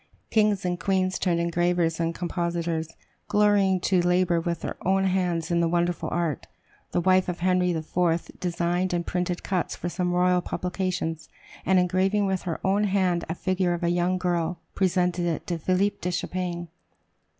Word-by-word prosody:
Kings 210 Hz, -4 st, +2 dB
and 175 Hz, -1 st, -1 dB
queens 190 Hz, -1 st, 0 dB
turned 175 Hz, -3 st, +1 dB
engravers 170 Hz, -1 st, +1 dB
and 165 Hz, 0 st, -1 dB
compositors, 170 Hz, -2 st, -2 dB, 0.4 s
glorying 205 Hz, -2 st, +3 dB
to 185 Hz, -1 st, +2 dB
labor 175 Hz, -1 st, +2 dB
with 170 Hz, -1 st, -3 dB
their -, -, -4 dB
own 190 Hz, +1 st, +2 dB
hands 180 Hz, -3 st, 0 dB
in 170 Hz, -, +2 dB
the 170 Hz, -, +2 dB
wonderful 175 Hz, +1 st, 0 dB
art. 170 Hz, -5 st, -2 dB, 0.4 s
The -, -, +1 dB
wife 185 Hz, +1 st, +3 dB
of 175 Hz, -1 st, -4 dB
Henry 180 Hz, 0 st, +2 dB
IV. 165 Hz, +1 st, 0 dB
designed 175 Hz, +1 st, -1 dB
and 170 Hz, -1 st, -1 dB
printed 180 Hz, -1 st, -2 dB
cuts 185 Hz, -3 st, -1 dB
for 175 Hz, -, -4 dB
some 180 Hz, 0 st, -1 dB
royal 180 Hz, 0 st, +3 dB
publications, 180 Hz, -3 st, -3 dB, 0.4 s
and 190 Hz, +1 st, +4 dB
engraving 190 Hz, +3 st, +2 dB
with 190 Hz, -1 st, 0 dB
her 165 Hz, -, -3 dB
own 200 Hz, +2 st, +2 dB
hand 185 Hz, -3 st, +1 dB
a 165 Hz, -, -2 dB
figure 185 Hz, -1 st, 0 dB
of 175 Hz, -, -6 dB
a 170 Hz, -, +2 dB
young 175 Hz, +1 st, +1 dB
girl, 175 Hz, -1 st, -1 dB, 0.2 s
presented 180 Hz, -2 st, +1 dB
it 165 Hz, -3 st, -2 dB
to 170 Hz, -2 st, -3 dB
"Philip 185 Hz, +5 st, 0 dB
de 180 Hz, -, -1 dB
Champagne." 175 Hz, 0 st, -3 dB
180 Hz, 170 wpm, -26 LUFS, 170-185 Hz, 0.4 s, and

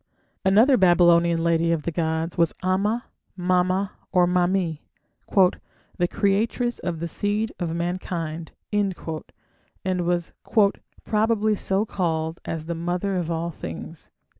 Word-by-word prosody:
Another 220 Hz, +8 st, +5 dB
Babylonian 170 Hz, -2 st, +4 dB
lady 165 Hz, 0 st, +2 dB
of 165 Hz, -3 st, 0 dB
the 170 Hz, -, -2 dB
gods 160 Hz, 0 st, -1 dB
was 170 Hz, -2 st, +2 dB
Ama, 205 Hz, +6 st, +1 dB, 0.3 s
Mama, 185 Hz, +2 st, +1 dB, 0.2 s
or 180 Hz, -1 st, +4 dB
Mami, 180 Hz, -2 st, +1 dB, 0.5 s
"the 180 Hz, -1 st, 0 dB
creatress 225 Hz, +6 st, 0 dB
of 170 Hz, -3 st, -3 dB
the 170 Hz, -, -1 dB
seed 205 Hz, +5 st, -1 dB
of 170 Hz, -2 st, -2 dB
mankind", 170 Hz, -2 st, -3 dB, 0.2 s
and 200 Hz, -3 st, +1 dB, 1.1 s
was 175 Hz, -1 st, -1 dB, 0.7 s
"probably 215 Hz, 0 st, +2 dB
so 195 Hz, 0 st, 0 dB
called 160 Hz, -5 st, -2 dB
as 160 Hz, -1 st, -4 dB
the 170 Hz, -, -3 dB
'mother' 175 Hz, +4 st, -2 dB
of 175 Hz, -2 st, -2 dB
all 170 Hz, +1 st, -2 dB
things". 85 Hz, -, -8 dB
175 Hz, 120 wpm, -24 LUFS, 170-195 Hz, 1.1 s, Another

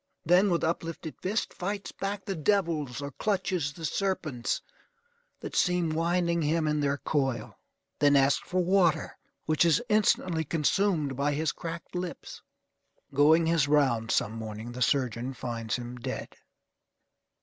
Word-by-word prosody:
Then, 180 Hz, +5 st, +5 dB
with 170 Hz, -2 st, +1 dB
uplifted 165 Hz, -1 st, -3 dB
fist, 205 Hz, +4 st, -1 dB
fights 200 Hz, +2 st, -4 dB
back 200 Hz, 0 st, -4 dB
the 200 Hz, -, -2 dB
devils, 155 Hz, -, 0 dB
or 140 Hz, -, -5 dB
clutches 185 Hz, -4 st, -1 dB
the 165 Hz, +2 st, -6 dB
serpents 155 Hz, -9 st, -1 dB, 0.8 s
that -, -, -6 dB
seem 180 Hz, -3 st, +2 dB
winding 170 Hz, +1 st, +1 dB
him 155 Hz, +1 st, +1 dB
in 150 Hz, 0 st, +1 dB
their 140 Hz, -1 st, +1 dB
coil. 135 Hz, -7 st, -2 dB, 0.4 s
Then 145 Hz, 0 st, +5 dB
asks 135 Hz, 0 st, +3 dB
for 185 Hz, 0 st, +1 dB
water, 180 Hz, -3 st, +2 dB, 0.3 s
which 155 Hz, +1 st, +3 dB
is 165 Hz, -3 st, +4 dB
instantly 185 Hz, -6 st, +2 dB
consumed 155 Hz, -1 st, +1 dB
by 145 Hz, +2 st, 0 dB
his 155 Hz, +2 st, 0 dB
cracked 170 Hz, 0 st, -7 dB
lips. 180 Hz, -1 st, -6 dB, 0.7 s
Going 155 Hz, +4 st, +5 dB
his 165 Hz, -3 st, +2 dB
round 130 Hz, -7 st, +2 dB
some 105 Hz, -, +1 dB
morning, 110 Hz, +1 st, -6 dB
the 125 Hz, +1 st, -7 dB
surgeon 125 Hz, -1 st, 0 dB
finds 115 Hz, -3 st, -3 dB
him 120 Hz, 0 st, -6 dB
dead. 120 Hz, -, -5 dB
155 Hz, 140 wpm, -28 LUFS, 135-180 Hz, 0.8 s, Then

